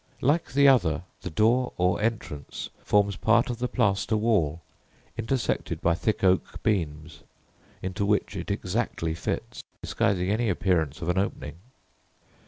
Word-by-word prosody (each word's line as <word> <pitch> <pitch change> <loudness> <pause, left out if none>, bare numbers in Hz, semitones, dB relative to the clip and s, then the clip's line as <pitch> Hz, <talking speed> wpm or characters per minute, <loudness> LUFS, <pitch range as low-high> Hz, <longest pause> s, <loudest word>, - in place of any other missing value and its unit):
Like 145 0 +1
the 140 +1 +5
other, 90 - +3 0.2
the - - -5
door, 115 +9 +2
or 90 +2 +1
entrance, 105 - -3
forms 100 -1 +2
part 115 +2 +3
of 120 - -6
the 125 - 0
plaster 105 -3 +1
wall, 90 -8 +1 0.5
intersected 115 +3 -1
by 85 - +2
thick 105 +5 -1
oak 95 -1 +1
beams, 80 -6 -2 0.6
into 95 +3 -2
which 100 0 +1
it - - -5
exactly 80 -1 -2
fits, 85 - -4 0.2
disguising 95 -1 0
any 110 +1 +1
appearance 85 -6 0
of 80 - -2
an 90 +2 +2
opening. 85 -5 -3
100 Hz, 140 wpm, -26 LUFS, 85-115 Hz, 0.6 s, the